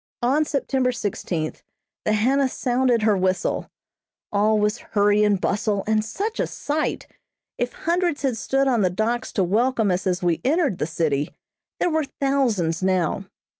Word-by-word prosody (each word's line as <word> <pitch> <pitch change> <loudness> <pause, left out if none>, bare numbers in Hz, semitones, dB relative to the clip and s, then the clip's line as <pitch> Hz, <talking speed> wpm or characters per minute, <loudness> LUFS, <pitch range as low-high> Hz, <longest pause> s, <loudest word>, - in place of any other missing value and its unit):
On 275 +6 +3
September 265 -3 0
sixteenth 180 -8 -3 0.4
the 215 - +2
Hannah 260 +6 +2
sounded 245 -2 +1
her 215 -1 +4
whistle 185 0 0 0.6
all 210 +1 +3
was 210 +2 +1
hurry 205 0 +2
and 205 -2 +3
bustle, 205 0 0
and 215 0 +2
such 410 - -4
a - - +1
sight! 300 +1 -2 0.5
If 245 0 -1
hundreds 340 -3 -1
had 265 -4 +1
stood 270 +4 +1
on 240 -4 +2
the 185 - +3
docks 220 +6 -1
to 195 - +2
welcome 225 +2 +2
us 180 +1 -1
as 180 0 0
we 170 -2 +1
entered 285 - +1
the 150 - -1
city, 155 -3 0 0.5
there 350 - +1
were 315 -1 +1
thousands 230 - +1
now. 185 +1 0
220 Hz, 160 wpm, -23 LUFS, 190-265 Hz, 0.6 s, her